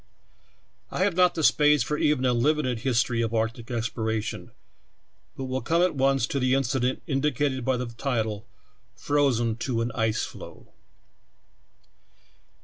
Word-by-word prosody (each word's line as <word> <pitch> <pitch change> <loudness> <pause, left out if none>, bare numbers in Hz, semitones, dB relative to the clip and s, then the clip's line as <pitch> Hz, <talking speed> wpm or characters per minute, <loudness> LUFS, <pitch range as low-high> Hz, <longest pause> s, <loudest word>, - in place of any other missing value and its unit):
I - - -1
have 200 -3 +1
not 180 0 +4
the 160 - -2
space 150 -3 +4
for 150 +4 -2
even 150 -3 +1
a 125 - +3
limited 130 -1 +1
history 120 -1 +1
of 115 0 -1
arctic 115 +1 -2
exploration, 110 -2 -3 0.9
but 135 - -4
will 130 0 -3
come 165 +8 +2
at 180 - +2
once 135 -2 +2
to 140 - -2
the 130 0 +2
incident 130 -1 -1
indicated 140 -2 0
by 130 +1 +1
the 125 - -3
title, 115 -3 -3 0.5
"Frozen 125 -7 +1
to 120 -1 -2
an 120 +1 -2
Ice 110 -1 0
Floe." - - -12
130 Hz, 140 wpm, -26 LUFS, 115-145 Hz, 0.9 s, not